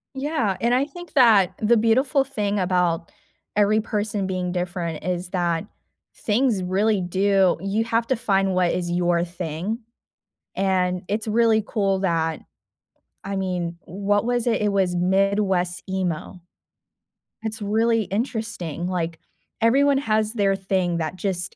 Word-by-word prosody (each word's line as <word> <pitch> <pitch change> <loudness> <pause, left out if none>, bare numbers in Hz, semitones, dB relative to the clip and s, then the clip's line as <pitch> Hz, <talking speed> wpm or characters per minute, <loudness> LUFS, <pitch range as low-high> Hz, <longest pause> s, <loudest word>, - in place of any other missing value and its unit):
Yeah, 265 - -1
and 235 +3 +2
I 265 +3 +2
think 350 +3 -11
that 225 - +5
the 230 +2 +4
beautiful 260 +5 +3
thing 210 -6 -2
about 180 -3 0 0.4
every 210 +1 +4
person 210 -2 -2
being 185 -1 -2
different 175 -3 -3
is 180 0 -2
that 175 0 -1 0.5
things 220 -2 +1
really 195 +3 +1
do 190 +1 +2
you 200 +3 0
have 230 0 0
to 260 - +1
find 195 -4 +1
what 180 -1 +2
is 175 -1 -2
your 175 -1 +1
thing, 175 +4 -4 0.8
and 185 -2 +1
it's 215 +2 -2
really 220 0 +3
cool 195 -3 0
that 165 -4 0 0.9
I 195 0 -3
mean, 180 -3 -2
what 200 +3 -1
was 245 0 0
it, 225 -3 +1
it 210 -1 +1
was 190 -3 +1
Midwest 190 -1 +1
emo. 185 -1 -3 1.0
It's 220 0 -4
really 225 +2 +2
interesting, 200 - -3
like, 170 -2 -3 0.4
everyone 275 +4 +4
has 215 -4 0
their 200 -4 +2
thing 190 -2 -1
that 160 +1 -3
just 185 -1 -3
195 Hz, 140 wpm, -23 LUFS, 180-220 Hz, 1.0 s, that